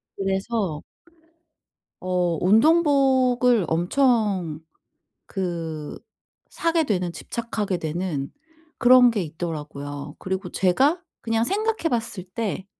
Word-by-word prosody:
그래서 195 -4 -2 1.2
어 180 -2 0
운동복을 255 - +4
엄청 185 - +1 0.7
그 165 -5 -4 0.5
사게 330 -1 +1
되는 180 - -1
집착하게 215 -3 -3
되는 160 -3 -3 0.5
그런 245 0 +7
게 210 -4 -1
있더라고요. 150 -3 -6
그리고 190 -1 -4
제가 270 - +2 0.2
그냥 225 0 0
생각해 425 - 0
봤을 230 -6 -2
때 190 0 -4
195 Hz, 195 characters per minute, -24 LUFS, 170-245 Hz, 1.2 s, 그런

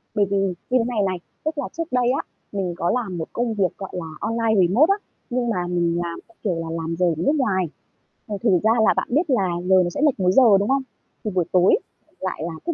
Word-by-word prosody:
Bởi 205 - +3
vì 200 0 -1
như 195 -2 +1 0.2
thế 255 - +4
này 230 -4 0
này, 185 -1 -2 0.3
tức 310 0 -2
là 285 - -2
trước 330 -1 -2
đây 250 -1 +2
á, 270 - 0 0.3
mình 190 -4 -2
có 170 - 0
làm 215 -8 -2
một 160 - -4
công 235 -1 -1
việc, 190 -5 0
gọi 195 - -6
là, 170 -3 -4
online 220 -4 +2
remote 285 - +4
á, 395 - +3 0.3
nhưng 240 -1 -1
mà 180 -5 -1
mình 170 -1 0
làm 170 -1 -5
theo 230 - -25
kiểu 185 -5 0
là 165 - -3
làm 165 +1 -3
giờ 180 - +3
ở 170 - +2
nước 285 - +2
ngoài. 190 -9 +1 0.6
À, 210 - -3
thành 190 -7 +4
ra 220 - +4
là - - +5
bạn - - 0
biết 305 +5 +1
là 220 -8 +2 0.2
giờ 190 - +6
nó 175 - -1
sẽ 230 - -4
lệch 290 -8 +3
múi 180 0 +3
giờ, 220 -3 +6
đúng 205 - -1
không? 270 0 +3 0.4
Thì 215 - -2
buổi 180 -2 +1
tối 180 0 +5 0.4
lại 185 -4 -4
là 170 - -4
thức 340 - 0
200 Hz, 260 wpm, -22 LUFS, 180-245 Hz, 0.6 s, giờ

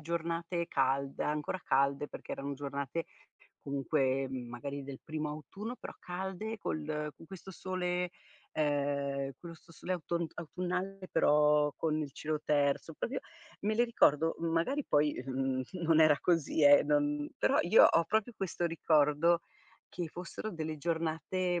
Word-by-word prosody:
giornate 170 +1 -2
calde, 135 +1 0
ancora 150 +4 -2
calde, 140 +2 +2
perché - - -8
erano 140 +1 -4
giornate 140 +3 -3 0.6
comunque, 135 -1 0
mhmm, 125 -2 -5
magari 140 +4 -5
del 135 -1 -8
primo 155 -1 -3
autunno 200 +10 -6
però - - -8
calde 190 +5 -4
col 155 -6 -3 0.3
con 165 - -15
questo 190 +1 -10
sole 180 -1 -2 0.4
ehm, 140 -2 0
questo 165 -1 -12
sole 180 +3 -4
autont 170 -1 -2
autunnale 180 +3 -4
però 150 0 +4
con 155 -1 0
il 145 -2 -4
cielo 155 0 -3
terso, 145 +2 +1
proprio 265 - -3 0.4
me 215 +1 +1
le 240 +2 +4
ricordo 165 -8 +3
magari 170 - 0
poi, 150 0 +3
ehm, 130 0 -1
n - - -3 0.2
non 160 -1 +4
era 155 -2 +6
così 165 -3 +1
eh 145 0 +8
non 145 0 +1
però - - +2
io 175 +6 +7
ho 165 - +5
proprio 220 +6 0
questo 185 -3 -3
ricordo 165 0 +3 0.5
che 175 -3 -4
fossero 180 +6 -6
delle 160 -3 -4
giornate, 170 +2 -1
155 Hz, 145 wpm, -32 LUFS, 145-175 Hz, 0.6 s, eh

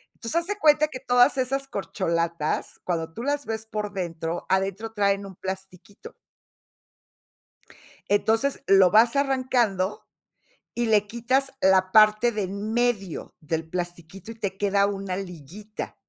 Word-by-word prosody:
Entonces, 310 +9 -1
haz 340 - -9
de 410 +1 -2
cuenta 305 -4 +4
que 260 - -7
todas 245 +1 +4
esas 270 +1 -1
corcholatas, 170 - -2
cuando 165 -2 -3
tú 230 - -6
las 285 +1 -1
ves 220 0 -4
por 210 -2 -4
dentro, 170 -2 -4
adentro 195 +3 -1
traen 200 -1 +1
un 195 -1 -10
plastiquito. 190 +1 -8 1.9
Entonces, 225 +7 +1
lo 195 -4 +6
vas 230 +6 +5
arrancando, 255 -8 0 0.7
y 240 - -1
le 210 -2 +3
quitas 255 +5 0
la 190 -2 +3
parte 215 +3 +5
de 210 -2 -2
en 200 +3 -4
medio 230 -7 -1
del 160 +1 -3
plastiquito 175 +3 -6
y - - -10
te 200 -3 -4
queda 200 0 +2
una 195 -2 -3
liguita 195 +3 -8
205 Hz, 140 wpm, -25 LUFS, 185-240 Hz, 1.9 s, lo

